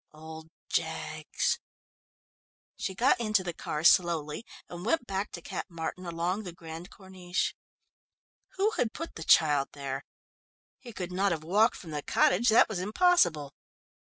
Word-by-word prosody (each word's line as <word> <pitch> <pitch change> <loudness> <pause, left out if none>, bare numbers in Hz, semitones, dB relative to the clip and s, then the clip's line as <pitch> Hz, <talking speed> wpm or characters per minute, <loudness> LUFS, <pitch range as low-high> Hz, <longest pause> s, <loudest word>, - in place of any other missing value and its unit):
Old 160 +1 -10 0.2
Jaggs! 155 -2 -1 1.2
She 190 - -4
got 245 +4 +3
into 215 -4 +1
the 175 -2 -4
car 150 -1 -4
slowly, 170 +1 +3 0.2
and 175 0 -8
went 245 +5 +1
back 195 0 -3
to 170 - -7
Cap - - -5
Martin 175 +2 -5
along 170 +4 -1
the 185 -4 -7
Grande 165 +1 -9
Corniche. 185 -2 -3 1.0
Who 410 +3 +2
had 235 -2 0
put 330 +2 -6
the 160 - -7
child 145 -4 +4
there? 135 -1 -5 0.8
He 240 - -10
could 185 -4 -5
not 195 +2 +1
have 160 -2 -2
walked 210 +8 +3
from 165 - -10
the 150 -1 -3
cottage; 215 - +3
that 220 - +6
was 220 -5 -4
impossible. 185 - +2
175 Hz, 150 wpm, -29 LUFS, 160-210 Hz, 1.2 s, that